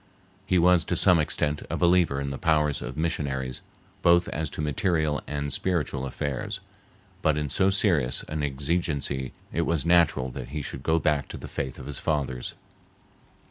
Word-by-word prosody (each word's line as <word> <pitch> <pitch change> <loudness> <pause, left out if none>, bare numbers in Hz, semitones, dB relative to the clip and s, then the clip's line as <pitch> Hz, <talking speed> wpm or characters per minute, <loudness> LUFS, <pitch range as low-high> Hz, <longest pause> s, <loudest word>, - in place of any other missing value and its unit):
He 95 - +3
was, 90 -1 +5
to 90 - -1
some 90 0 +5
extent, 75 -1 0
a - - -1
believer 85 -5 +3
in 70 0 -3
the 70 - -5
powers 75 -3 +2
of - - -6
missionaries, 70 -6 -2 0.4
both 85 0 +5
as 80 -1 -2
to - - -10
material 75 0 +1
and 70 -1 -2
spiritual 75 -6 -1
affairs, 65 -1 -3 0.6
but 80 -1 +2
in 75 -1 -1
so 95 +7 +3
serious 85 - +2
an 75 -1 -4
exigency 70 -2 -1 0.2
it 85 - +1
was 85 -3 0
natural 85 -7 +3
that - - -7
he 75 +1 -4
should 65 - -5
go 80 +4 +2
back 75 -4 +1
to - - -7
the - - -8
faith 65 - -4
of - - -9
his 75 - -3
fathers. 65 -5 -2
75 Hz, 175 wpm, -26 LUFS, 70-85 Hz, 0.6 s, was